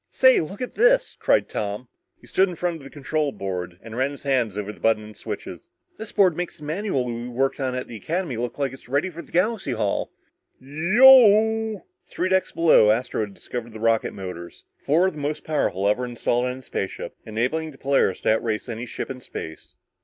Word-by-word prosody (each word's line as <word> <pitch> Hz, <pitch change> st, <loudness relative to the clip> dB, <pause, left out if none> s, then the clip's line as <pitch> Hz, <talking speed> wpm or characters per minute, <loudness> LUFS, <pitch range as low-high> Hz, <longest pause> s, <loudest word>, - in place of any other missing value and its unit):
"Say 260 Hz, 0 st, +5 dB
look 195 Hz, +9 st, -5 dB
at 250 Hz, -, -6 dB
this!" -, -, +3 dB
cried -, -, +2 dB
Tom. 105 Hz, +4 st, -4 dB, 0.3 s
He -, -, -18 dB
stood 190 Hz, 0 st, +2 dB
in 180 Hz, -, -6 dB
front 175 Hz, 0 st, -2 dB
of 150 Hz, -, -14 dB
the 135 Hz, -, -10 dB
control 150 Hz, +1 st, -2 dB
board 90 Hz, -5 st, -5 dB
and 115 Hz, 0 st, -9 dB
ran 130 Hz, +3 st, +1 dB
his 140 Hz, -, -10 dB
hands 125 Hz, -7 st, 0 dB
over 105 Hz, 0 st, -4 dB
the -, -, -18 dB
buttons 110 Hz, -1 st, +1 dB
and 105 Hz, 0 st, -12 dB
switches. -, -, -7 dB, 0.3 s
"This 220 Hz, 0 st, -7 dB
board 185 Hz, -5 st, +4 dB
makes 175 Hz, +1 st, -4 dB
the 150 Hz, -, -14 dB
manual 155 Hz, -3 st, -1 dB
we 120 Hz, 0 st, -4 dB
worked 135 Hz, +3 st, -1 dB
on 130 Hz, -2 st, -1 dB
at 125 Hz, -, -4 dB
the 115 Hz, -, -8 dB
Academy 165 Hz, -, -3 dB
look 120 Hz, +1 st, -4 dB
like 140 Hz, -2 st, -1 dB
it's 130 Hz, -3 st, -14 dB
ready 145 Hz, +8 st, 0 dB
for 170 Hz, 0 st, -8 dB
Galaxy 185 Hz, -, 0 dB
Hall!" 110 Hz, -3 st, -1 dB, 0.5 s
"Yeeeooooooww!" 220 Hz, -, +5 dB, 0.2 s
Three 185 Hz, -, -2 dB
decks 190 Hz, 0 st, +1 dB
below, 165 Hz, -10 st, +5 dB
Astro 110 Hz, +1 st, +1 dB
had 100 Hz, -2 st, -5 dB
discovered 120 Hz, -2 st, -7 dB
the 110 Hz, -, -8 dB
rocket 115 Hz, 0 st, +1 dB
motors. 90 Hz, -3 st, -8 dB
Four 160 Hz, +6 st, +2 dB
of 190 Hz, -, 0 dB
the 150 Hz, -, -9 dB
most 150 Hz, +1 st, -3 dB
powerful 100 Hz, -, 0 dB
ever 105 Hz, +5 st, +1 dB
installed 120 Hz, 0 st, -1 dB
on 125 Hz, 0 st, -3 dB
a -, -, -11 dB
spaceship, 95 Hz, -5 st, -5 dB
enabling 125 Hz, +9 st, -1 dB
the 140 Hz, -, -14 dB
Polaris 135 Hz, -10 st, +1 dB
to -, -, +3 dB
outrace 110 Hz, 0 st, -2 dB
any 120 Hz, +1 st, -5 dB
ship -, -, -5 dB
in 130 Hz, -1 st, -8 dB
space. 80 Hz, -8 st, -8 dB
135 Hz, 210 wpm, -24 LUFS, 115-170 Hz, 0.5 s, Say